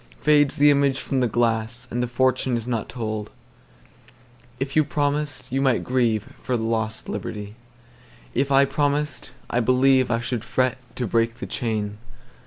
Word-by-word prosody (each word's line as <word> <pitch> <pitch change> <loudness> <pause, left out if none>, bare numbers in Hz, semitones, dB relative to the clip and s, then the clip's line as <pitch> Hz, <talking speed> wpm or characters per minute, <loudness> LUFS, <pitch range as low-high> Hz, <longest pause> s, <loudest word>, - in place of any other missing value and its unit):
Fades 145 -2 +3
the 145 +1 +6
image 140 -1 +2
from 135 - -1
the 125 - +2
glass, 115 +1 -1
And 120 - -1
the 125 - 0
fortune 130 0 +1
is 115 - -5
not 120 -3 -2
told. 110 -3 -4 1.3
If 135 +1 -3
you 155 - +5
promised, 145 -2 -2
you 135 +1 0
might 130 -3 +2
grieveFor 120 0 -1
lost 110 -1 -2
liberty 105 -1 -5 0.8
again:If 140 +2 0
I 135 0 +6
promised, 145 0 -1 0.2
I 120 - +2
believeI 130 -1 +3
should 120 -1 -3
fret 130 +2 0 0.2
to 125 - -2
break 115 +2 +1
the - - -6
chain. 105 -3 -3
125 Hz, 150 wpm, -23 LUFS, 115-135 Hz, 1.3 s, the